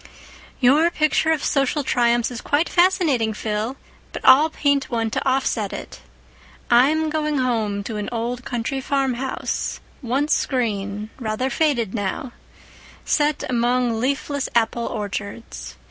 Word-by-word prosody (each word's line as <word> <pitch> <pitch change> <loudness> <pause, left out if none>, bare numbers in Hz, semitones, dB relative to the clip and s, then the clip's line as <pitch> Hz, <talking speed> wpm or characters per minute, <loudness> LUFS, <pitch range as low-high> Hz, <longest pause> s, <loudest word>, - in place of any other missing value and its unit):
"Your 290 +6 +5
picture 310 -1 +1
of 315 -2 0
social 275 +1 +1
triumphs 240 -2 +2
is 240 - -6
quite 295 +4 +1
fascinating, 315 - +2
Phil, 220 +5 -3 0.3
but - - -7
I'll 285 +5 +7
paint 285 -3 0
one 225 -2 -1
to - - -1
offset 255 -6 0
it. - - -8 0.7
I'm 305 +6 +4
going 305 -1 0
home 220 -6 0
to 215 +1 -5
an 210 - -3
old 240 +1 -3
country 245 +3 -3
farmhouse, 265 -1 -2 0.2
once 270 +4 +1
green, 210 -4 -2
rather 240 +3 -2
faded 240 -8 +1
now, 210 +4 -3 0.7
set 295 -1 +1
among 245 -1 +1
leafless 280 +2 -1
apple 235 0 +1
orchards. 205 +1 -6
250 Hz, 130 wpm, -22 LUFS, 225-285 Hz, 0.7 s, I'll